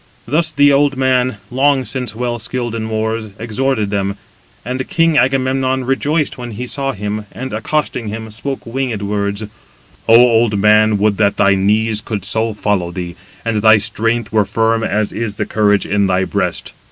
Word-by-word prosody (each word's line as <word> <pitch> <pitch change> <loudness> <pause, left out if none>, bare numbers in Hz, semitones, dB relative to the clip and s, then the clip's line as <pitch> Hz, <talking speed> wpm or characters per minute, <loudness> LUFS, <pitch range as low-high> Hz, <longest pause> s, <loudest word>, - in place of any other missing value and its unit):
Thus 155 +5 +1
the 145 -1 +4
old 140 -1 +2
man, 130 -3 +1
long 135 +1 +2
since 125 -5 -4
well 120 0 -3
skilled 120 0 -3
in 110 -1 -4
wars, 110 0 -2
exhorted 115 -1 -1
them, 100 0 -2 0.5
and 130 +2 -4
king 165 -1 +2
Agamemnon 130 -1 +1
rejoiced 145 +3 -1
when 120 -2 -6
he 120 +5 -5
saw 135 +2 -2
him; 105 +1 -5
and 130 -1 -7
accosting 120 +1 -2
him, 110 +1 -6
spoke 135 +5 -5
winged 115 -3 -3
words: 100 0 -2 0.7
"O 115 - +7
old 115 -3 +4
man, 105 +1 +4
would 100 0 +1
that 100 -2 +1
thy 100 - +4
knees 105 +3 +2
could 105 -3 -4
so 110 +1 +1
follow 100 -4 -1
thee, 85 -1 -6 0.3
and 110 -2 0
thy 110 0 +6
strength 115 +2 +1
were 110 -1 +3
firm 115 +2 0
as 105 -1 0
is 110 -2 -4
the - - -2
courage 105 -2 +1
in 100 0 +1
thy 95 0 +1
breast. - - -3
115 Hz, 175 wpm, -16 LUFS, 105-130 Hz, 0.7 s, O